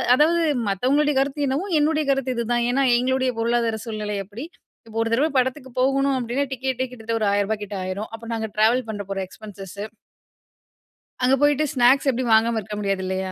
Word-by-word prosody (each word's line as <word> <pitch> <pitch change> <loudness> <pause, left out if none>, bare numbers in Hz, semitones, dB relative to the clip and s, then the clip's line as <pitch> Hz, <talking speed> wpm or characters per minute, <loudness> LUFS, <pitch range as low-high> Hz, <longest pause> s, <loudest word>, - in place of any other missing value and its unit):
அதாவது 330 +5 +3 0.3
மத்தவங்களுடைய 280 +9 +2
கருத்து 285 +1 -1
என்னவோ, 275 +8 -1 0.2
என்னுடைய 310 0 +1
கருத்து 270 -2 -1
இதுதான். 235 0 0
ஏன்னா, 275 +2 +2
எங்களுடைய 260 +1 +1
பொருளாதார 230 -1 +1
சூழ்நிலை 210 -2 -3
அப்பிடி. 215 +8 -8 0.4
இப்ப 225 0 -8
ஒரு 225 - 0
தடவ 275 +7 +3
படத்துக்கு 260 +1 -1
போகணும் 275 +1 +2
அப்டின்னா, 250 +3 -1
டிக்கெட்டே 260 0 -2
கிட்டத்தட்ட 230 -2 -3
ஒரு 215 - 0
1000ரூபா 205 +2 +1
கிட்ட 205 0 -6
ஆயிரும். 185 +3 -4
அப்புறம் 230 +1 -6
நாங்க 220 -1 -3
ட்ராவல் 225 +3 +3
பண்ண 205 -2 -4
போற 195 0 -2
எக்ஸ்பென்சஸ்ஸூ. 200 -1 -9 1.4
அங்க 255 +2 +5
போயிட்டு 290 +1 +3
ஸ்நாக்ஸ் 260 +2 +4
எப்புடியும் 245 -2 +1
வாங்காம 225 +1 +2
இருக்க 210 +1 -7
முடியாது 195 -2 -1
இல்லையா? 190 0 -2
240 Hz, 170 wpm, -23 LUFS, 215-270 Hz, 1.4 s, அங்க